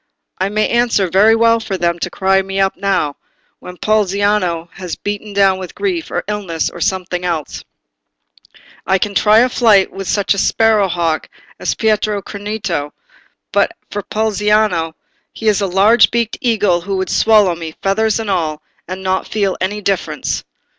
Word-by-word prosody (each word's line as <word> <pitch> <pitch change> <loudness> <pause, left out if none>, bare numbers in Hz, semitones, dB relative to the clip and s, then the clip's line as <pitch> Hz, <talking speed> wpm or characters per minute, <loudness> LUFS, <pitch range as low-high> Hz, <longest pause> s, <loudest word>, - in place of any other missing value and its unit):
It 190 - +1
may 215 +1 +1
answer 235 -6 +1
very 210 +4 +5
well 230 0 +3
for 210 -4 -4
them 170 -1 0
to - - -2
cry 190 0 +2
me 195 0 -4
up 195 0 +1
now, 190 -7 -1 0.4
when 180 0 -10
Poliziano 200 -5 +1
is 180 -3 -5
beaten 205 +1 -5
down 195 -2 +3
with 185 -2 -8
grief, 365 -5 -2
or - - -2
illness, 195 -6 -2
or 170 - -10
something 180 0 -1
else; 165 -4 -3 1.2
I 190 - +3
can 200 +2 -2
try 215 +2 +5
a 250 - +4
flight 215 -6 +3
with 195 0 -7
such 200 -1 +1
a 200 - -3
sparrow 220 -1 +3
hawk 170 -3 -1 0.3
as - - -1
Pietro 215 -1 +1
Crinito, 200 -8 -4 0.6
but - - +2 0.2
for 205 - -3
Poliziano, 210 -5 0 0.4
he 225 - -5
is 210 -1 +3
a 200 - +1
large 205 +5 +5
beaked 235 -2 -1
eagle 205 -8 +2
who 195 +2 -3
would 190 -1 -2
swallow 210 -5 +4
me, 165 -2 -7
feathers 220 +3 +1
and 220 -3 -2
all, 155 -4 -2 0.2
and 185 +2 -6
not 190 0 -1
feel 200 -3 -1
any 205 +3 -2
difference." 195 -2 -2
195 Hz, 165 wpm, -16 LUFS, 185-215 Hz, 1.2 s, very